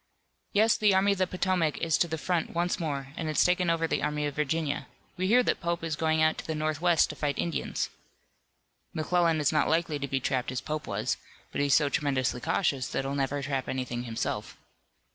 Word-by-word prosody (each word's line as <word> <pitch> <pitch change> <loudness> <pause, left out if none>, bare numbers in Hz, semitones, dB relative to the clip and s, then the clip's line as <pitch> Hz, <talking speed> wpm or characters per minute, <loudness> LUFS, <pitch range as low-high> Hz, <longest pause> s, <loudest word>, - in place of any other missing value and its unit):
"Yes, 220 +2 +4
the 210 -2 +4
Army 195 +2 +4
of 200 - -1
the 185 - +2
Potomac 180 -4 0
is 165 -1 +1
to 170 - +3
the 160 -1 -3
front 170 +1 -1
once 175 +1 0
more, 140 -5 -3
and 160 - -3
it's 155 - +3
taken 180 0 +2
over 165 0 +1
the - - 0
Army 150 0 -1
of 145 - -2
Virginia. 150 0 -1 0.3
We 185 0 -1
hear 245 +5 +5
that - - 0
Pope 170 0 -2
is 160 -2 -1
going 160 0 +2
out 155 0 +2
to - - -7
the 160 - -2
northwest 155 +2 +2
to - - -9
fight 145 -2 -1
Indians." 170 - -2 1.0
"McClellan 165 0 +2
is 150 - +2
not 150 -2 +2
likely 160 -2 +1
to 140 - -3
be 135 0 0
trapped 130 -1 -1
as 130 - -2
Pope 155 0 -4
was, - - -1 0.3
but - - -1
he's 140 -1 +4
so 150 - +4
tremendously 135 -4 0
cautious 145 -4 0
that - - -2
he'll 135 - -2
never 140 0 -1
trap 135 -1 -2
anything 125 -2 -3
himself. 115 -1 -3
155 Hz, 215 wpm, -28 LUFS, 140-170 Hz, 1.0 s, hear